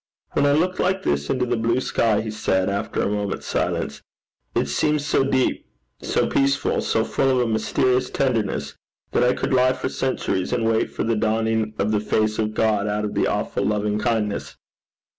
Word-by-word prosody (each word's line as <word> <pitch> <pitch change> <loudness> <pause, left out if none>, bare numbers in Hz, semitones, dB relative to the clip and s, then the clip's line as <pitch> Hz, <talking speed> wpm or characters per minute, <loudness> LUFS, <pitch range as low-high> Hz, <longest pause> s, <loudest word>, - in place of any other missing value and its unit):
'When 145 - +2
I 145 - +4
look 180 +5 +1
like 190 +1 +1
this 70 0 0
into 125 -1 +1
the 120 0 0
blue 115 +2 +1
sky,' 115 -4 +1
he 110 0 -4
said, 95 -2 0
after 100 - -2
a - - +1
moment's 105 -1 -2
silence, 70 +1 -2 0.5
'it - - +2
seems 150 -1 0
so 145 - +2
deep, 130 -1 0 0.3
so - - +1
peaceful, 140 +1 +1
so 110 0 +1
full 135 - +1
of 130 - +3
a 120 - +1
mysterious 125 +3 +1
tenderness, 105 - -1 0.4
that - - +2
I 125 +1 +4
could - - -2
lie 130 0 +4
for - - -3
centuries, 130 -9 -1
and 120 -2 0
wait 115 0 +1
for - - -3
the 115 0 +1
dawning 110 0 0
of 105 +2 0
the 105 - +2
face 110 +1 0
of 110 -1 -1
God 105 -2 +1
out 105 0 -1
of 105 - -4
the - - +1
awful - - -1
loving 105 0 0
kindness.' 110 -3 -1
110 Hz, 195 wpm, -23 LUFS, 105-130 Hz, 0.5 s, I